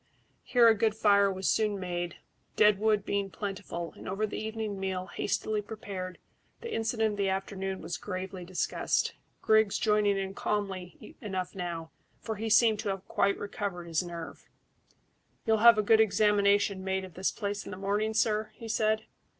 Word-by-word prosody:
Here 240 -2 +4
a 225 - +8
good 220 0 +1
fire 200 -2 +4
was 190 -1 -3
soon 210 -2 +1
made, 175 -2 -3 0.4
dead 210 -2 +5
wood 210 -2 +2
being 200 -1 -1
plentiful, 195 -4 -5
and - - -8
over 195 +3 0
the 210 - -5
evening 220 -2 -4
meal, 190 -1 -2
hastily 215 +2 -2
prepared, 195 -3 -6 0.4
the 465 -1 -5
incident 225 -1 0
of 205 - -6
the 195 -1 +2
afternoon 190 0 -3
was - - -4
gravely 185 -1 -5
discussed, 180 +1 0 0.3
Griggs 220 -2 +4
joining 210 -2 +2
in 195 0 -3
calmly 195 -4 -4
enough 190 -3 -3
now, 170 -3 -5 0.3
for 220 -2 -5
he 225 +2 -3
seemed 220 0 +5
to - - -2
have 195 -1 -4
quite 200 - +1
recovered 200 -3 -4
his 165 0 0
nerve. 170 -2 -8 1.0
"You'll 220 -1 +3
have 230 0 +7
a 215 - +2
good 220 +1 +5
examination 205 -2 +3
made 190 0 -1
of 185 - -13
this 185 +3 0
place 205 -1 -4
in - - -7
the 185 - -6
morning, 205 +3 -1
sir?" 215 -1 +1
he 230 - -9
said. 220 0 +1
200 Hz, 175 wpm, -30 LUFS, 190-215 Hz, 1.0 s, a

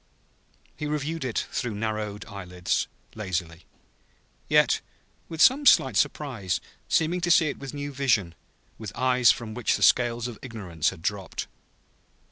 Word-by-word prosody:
He 150 - -4
reviewed 150 +2 -2
it 125 -4 -1
through 120 -5 -2
narrowed 105 -1 -3
eyelids, 90 -4 -2 0.3
lazily; 90 -5 -4 0.8
yet - - +4 0.5
with 160 -1 +2
some 280 +2 +5
slight 130 -5 +6
surprise, 120 - 0 0.3
seeming 170 +3 +1
to 175 - 0
see 165 -2 +5
it - - -6
with 135 +1 -7
new 145 0 -5
vision, 110 -11 +1 0.5
with 110 -4 -6
eyes 125 0 +4
from 110 -2 -5
which 120 +1 +1
scales 120 -1 +3
of 115 -4 -8
ignorance 95 - -2
had 80 - -11
dropped. 100 -2 -3
115 Hz, 135 wpm, -26 LUFS, 100-145 Hz, 0.8 s, slight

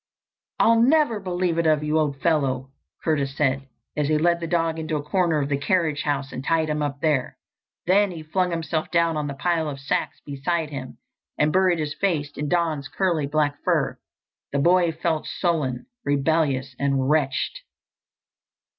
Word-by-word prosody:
"I'll 230 0 +5
never 270 -3 +3
believe 180 -3 -1
it 165 - +2
of 155 -1 +3
you, 155 +1 +1
old 145 -3 -1
fellow!" 135 -5 +1 0.3
Curtis 140 -3 0
said, 135 -1 +1 0.3
as 150 -1 0
he 155 0 +2
led 170 +2 +2
the 165 - -4
dog 165 -1 0
into 160 0 -2
a 145 - -2
corner 170 0 +1
of 140 - -1
the 140 -1 0
carriage 160 -2 +1
house 140 -2 -2
and 130 - -6
tied 160 +1 +1
him 150 0 -1
up 140 -1 -3
there. 150 -5 0 0.5
Then 200 +3 +4
he 165 -3 -7
flung 180 +4 0
himself 165 -2 -2
down 170 -1 +2
on 150 -1 -2
a 140 - -5
pile 165 +1 0
of 140 -1 -6
sacks 135 - -2
beside 150 +3 -2
him 130 -3 -7 0.4
and 150 +1 +2
buried 185 -2 +3
his 150 -2 -2
face 155 -7 -1
in 150 0 -3
Don's 160 -5 0
curly 170 -6 0
black 145 -1 0
fur. - - 0 0.5
The 140 - 0
boy 175 +3 +4
felt 160 -1 -2
sullen, 150 -9 -1 0.2
rebellious 140 -2 +1
and 135 -1 +1
wretched. 150 - 0
155 Hz, 175 wpm, -24 LUFS, 140-170 Hz, 0.5 s, I'll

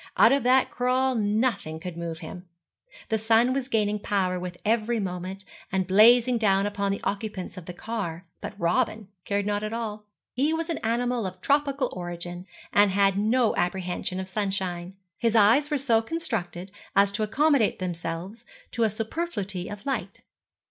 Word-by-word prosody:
Out - - +7
of 275 0 +3
that 255 +1 +3
crawl 255 +1 +1
nothing 210 -6 0
could 175 0 -6
move 170 -1 -5
him. 180 0 -9 0.6
The 220 - +1
sun 225 +3 +3
was 265 -1 -2
gaining 210 -4 +1
power 185 -3 0
with 180 0 -6
every 225 +1 +1
moment, 190 0 -5 0.3
and 190 -1 +1
blazing 235 +5 +6
down 195 -2 +3
upon 200 -1 -1
the 200 - -4
occupants 205 -2 -3
of 180 -3 -10
the 180 - -6
car; 185 -6 -4 0.2
but - - -7
Robin 215 +3 0 0.2
cared 200 0 0
not 205 0 0
at 215 +1 -4
all. 215 -2 -4 0.3
He 290 +6 +1
was 330 +1 -2
an 325 - -2
animal 235 -1 0
of 185 0 -8
tropical 280 +2 +1
origin, 175 0 -5 0.3
and 205 0 +5
had 195 0 +3
no 220 +3 +2
apprehension 180 +1 -2
of 190 - -4
sunshine; 190 -2 -3 0.2
his 230 -1 +1
eyes 230 +8 +5
were 295 - +1
so 240 -5 +3
constructed 225 - -3 0.2
as 200 0 +5
to 205 +2 -3
accommodate 265 +2 +2
themselves 175 +3 -5 0.3
to 235 - -3
a 225 - +4
superfluity 215 - -4
of 205 0 -8
light. 225 -9 -3
205 Hz, 170 wpm, -26 LUFS, 185-235 Hz, 0.6 s, Out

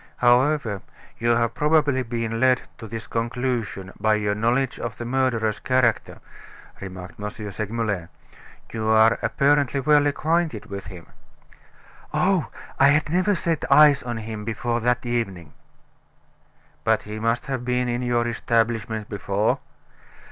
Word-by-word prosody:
"However, 125 -4 +2 0.4
you 120 0 +2
have 115 0 +1
probably 150 -1 +2
been 115 -1 -3
led 130 0 +3 0.2
to 115 - -8
this 115 +1 -6
conclusion 115 -5 -3
by 110 0 +3
your 105 -1 0
knowledge 120 +5 0
of 115 -3 -5
the 120 - -6
murderer's 120 -4 0
character," 130 -3 0 0.6
remarked 90 -2 -9
M. 105 0 -3
Segmuller, 105 -3 -4 0.6
"you 110 -1 -2
are 110 +1 +5
apparently 140 -1 +2
well 145 +1 +4
acquainted 155 -4 0
with 100 0 -7
him." 90 -4 -10 1.1
"Oh, 185 -3 +2 0.3
I 135 - +7
had 150 +2 +3
never 185 +4 +2
set 165 -3 -1
eyes 145 -1 +7
on 120 -2 -4
him 110 -1 -6
before 115 +2 -2
that 125 +1 0
evening." 100 -10 -3 1.3
"But - - +2
he 105 +1 -7
must 115 +3 0
have 130 -4 -3
been 125 0 0
in 120 0 -1
your 120 -1 +1
establishment 115 -2 -1
before?" 100 +1 0
120 Hz, 135 wpm, -23 LUFS, 110-130 Hz, 1.3 s, I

